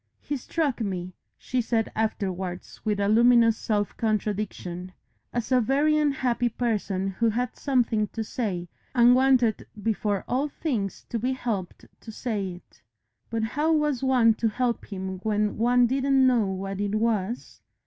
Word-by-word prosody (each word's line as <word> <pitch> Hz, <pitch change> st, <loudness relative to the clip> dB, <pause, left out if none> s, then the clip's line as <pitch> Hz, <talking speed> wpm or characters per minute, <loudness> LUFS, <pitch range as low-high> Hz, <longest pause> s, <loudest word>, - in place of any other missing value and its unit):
"He 290 Hz, -, -4 dB
struck 280 Hz, -1 st, -1 dB
me," 185 Hz, -3 st, -3 dB, 0.2 s
she 255 Hz, -1 st, -1 dB
said 225 Hz, -1 st, 0 dB
afterwards 190 Hz, -4 st, -3 dB
with 210 Hz, -2 st, 0 dB
a 200 Hz, -, +1 dB
luminous 230 Hz, +1 st, +5 dB
self 210 Hz, -2 st, -1 dB
contradiction, 205 Hz, -4 st, -2 dB, 0.4 s
"as 240 Hz, +1 st, -3 dB
a 255 Hz, -1 st, +5 dB
very 285 Hz, +6 st, +2 dB
unhappy 260 Hz, -5 st, +1 dB
person 210 Hz, -5 st, -1 dB
who 225 Hz, +4 st, +1 dB
had 245 Hz, +3 st, -2 dB
something 235 Hz, -6 st, +1 dB
to 225 Hz, -, -4 dB
say, 195 Hz, -7 st, -3 dB, 0.3 s
and 240 Hz, 0 st, +7 dB
wanted 255 Hz, -4 st, +3 dB
before 210 Hz, -2 st, -1 dB
all 275 Hz, +4 st, 0 dB
things 235 Hz, -, -3 dB
to 230 Hz, -, -2 dB
be 255 Hz, +4 st, 0 dB
helped 220 Hz, -8 st, -4 dB
to 225 Hz, -, -10 dB
say 215 Hz, -3 st, -3 dB
it. 175 Hz, -8 st, -17 dB, 0.5 s
But 225 Hz, -1 st, -1 dB
how 295 Hz, +8 st, +1 dB
was 300 Hz, -5 st, +1 dB
one 250 Hz, -4 st, +4 dB
to 230 Hz, -, +3 dB
help 245 Hz, +1 st, -1 dB
him 190 Hz, -1 st, -4 dB
when 210 Hz, +1 st, -1 dB
one 245 Hz, +1 st, +4 dB
didn't 270 Hz, +1 st, +3 dB
know 240 Hz, -5 st, +3 dB
what 195 Hz, +1 st, -4 dB
it 205 Hz, 0 st, -1 dB
was?" 220 Hz, 0 st, -1 dB
225 Hz, 155 wpm, -26 LUFS, 205-250 Hz, 0.5 s, and